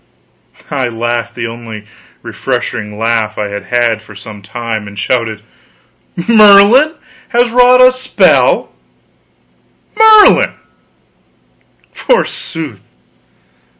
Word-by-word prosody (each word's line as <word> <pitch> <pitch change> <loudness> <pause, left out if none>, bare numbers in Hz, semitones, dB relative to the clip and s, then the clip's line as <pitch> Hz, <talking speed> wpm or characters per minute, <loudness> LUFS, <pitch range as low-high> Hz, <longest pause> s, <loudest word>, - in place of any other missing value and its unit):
I 135 -3 -2
laughed 120 0 -4
the 120 - -5
only 115 0 -9
really 105 0 -12 0.4
refreshing 105 0 -5
laugh 115 -1 -2
I 105 -1 -4
had 100 0 -7
had 120 -2 -1
for 105 -1 -16
some 105 0 -11
time; 110 +1 -6
and 100 0 -12
shouted: 110 -1 -3 0.8
"Merlin 220 +7 +5 0.3
has 240 -1 0
wrought 250 +1 +4
a 255 0 +6
spell! 260 - +1 1.2
Merlin, 435 -1 +5 1.4
forsooth! 160 - -3
120 Hz, 95 wpm, -12 LUFS, -, 1.4 s, a